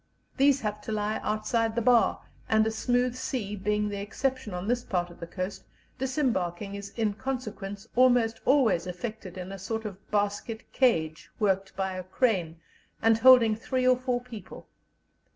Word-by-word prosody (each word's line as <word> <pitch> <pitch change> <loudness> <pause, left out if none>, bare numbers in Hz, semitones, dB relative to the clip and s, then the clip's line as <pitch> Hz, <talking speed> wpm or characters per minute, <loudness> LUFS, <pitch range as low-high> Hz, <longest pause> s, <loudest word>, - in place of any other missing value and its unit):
These 275 0 +4
have 210 -1 -3
to 220 - -6
lie 210 0 -1
outside 220 +1 0
the 235 - +1
bar, 240 -1 +4 0.3
and 220 0 +4
a 220 - 0
smooth 245 +2 +1
sea 250 -5 -3
being 210 +1 0
the 200 -1 -4
exception 255 +2 -2
on 180 +2 -4
this 245 +1 +1
part 175 -2 -2
of 175 - -15
the 170 - -6
coast, 185 +3 -5 0.4
disembarking 210 - -1
is 200 0 -6
in 220 -3 +1
consequence 215 -4 -5
almost 245 -3 +4
always 225 -11 +3
effected 190 0 -6
in 185 +1 -6
a 195 - -7
sort 220 +4 -4
of 200 -2 -8
basket 205 +2 -1
cage, 160 -12 +1
worked 195 -2 0
by 190 -1 -2
a 185 0 -5
crane, 185 -5 0 0.4
and 225 0 +3
holding 240 -3 +7
three 255 +3 -1
or 255 - +6
four 250 -1 -1
people. 240 -4 -11
215 Hz, 170 wpm, -28 LUFS, 195-245 Hz, 0.4 s, holding